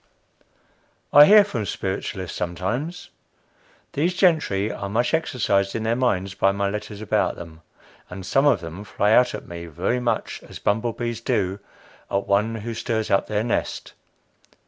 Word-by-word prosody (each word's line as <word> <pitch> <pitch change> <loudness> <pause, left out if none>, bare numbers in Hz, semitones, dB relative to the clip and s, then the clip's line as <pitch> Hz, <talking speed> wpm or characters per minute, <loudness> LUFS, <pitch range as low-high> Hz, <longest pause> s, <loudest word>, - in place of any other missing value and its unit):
I 145 +1 +10
hear 210 +4 +8
from 115 - -4
spiritualists 95 -2 -4
sometimes. 115 - -3 0.8
These 170 +5 0
gentry 155 - +2
are 100 - -5
much 120 +7 0
exercised 105 -11 +1
in 115 - -2
their 115 +1 +1
minds 100 -7 0
by 95 0 +2
my 100 0 -1
letters 105 0 -6
about 110 - 0
them, 80 -1 -11 0.5
and 90 0 -8
some 135 +7 +3
of 135 -8 +3
them 85 +4 -7
fly 105 +1 0
out 125 0 +4
at 105 - -9
me 85 0 -7
very 90 +10 -1
much 120 -3 -2
as - - -11
bumble 110 +3 0
bees 120 -1 -4
do 95 -3 -1 0.5
at 100 0 -1
one 105 +3 +1
who 120 - -3
stirs 110 -1 -2
up 100 - +2
their 105 0 0
nest. 120 - -2
105 Hz, 160 wpm, -23 LUFS, 95-120 Hz, 0.8 s, I